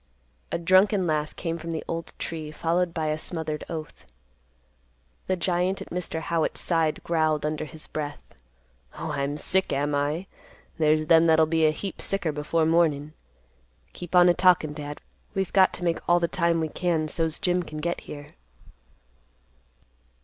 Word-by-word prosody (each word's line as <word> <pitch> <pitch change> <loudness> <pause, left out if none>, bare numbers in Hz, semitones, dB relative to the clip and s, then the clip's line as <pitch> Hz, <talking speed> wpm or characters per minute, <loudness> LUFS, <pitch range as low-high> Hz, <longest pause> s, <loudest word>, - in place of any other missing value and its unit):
A - - 0
drunken 185 +3 +4
laugh 155 -2 -1
came 165 0 -3
from 165 +1 -7
the 160 -1 -3
old 165 0 -4
tree, 160 -2 -5
followed 170 +3 0
by 160 -2 -2
a 155 0 -1
smothered 160 -2 -2
oath. 160 -2 -7 1.2
The 185 - +1
giant 180 +2 0
at - - -9
Mr. 170 -2 -3
Howitt's 165 -1 -1
side 165 -3 0
growled 155 -3 +1
under 155 0 -2
his 155 +1 -5
breath, 145 -1 -4 0.8
"Oh, 160 -1 -4
I'm 140 0 -2
sick, 190 +5 0
am 145 +1 0
I? 145 +5 0 0.5
There's 155 0 +3
them 165 +1 +5
that'll 160 0 +5
be 160 0 +3
a - - +3
heap 190 +5 -6
sicker 195 -5 -1
before 150 +2 0
mornin'. 155 -3 +2 0.8
Keep 175 0 -6
on 180 0 +8
a 175 - +6
talkin', 175 -4 +3
Dad. 150 -1 -7 0.3
We've 190 -1 -1
got 190 -1 +6
to 180 - -6
make 170 -2 +1
all 175 0 +5
the 170 - +1
time 170 -1 +1
we 160 - -1
can, 165 -2 0
so's 160 0 0
Jim 180 -2 +1
can 155 -3 -8
get 170 +3 -2
here." 145 0 -9
165 Hz, 165 wpm, -26 LUFS, 155-175 Hz, 1.2 s, on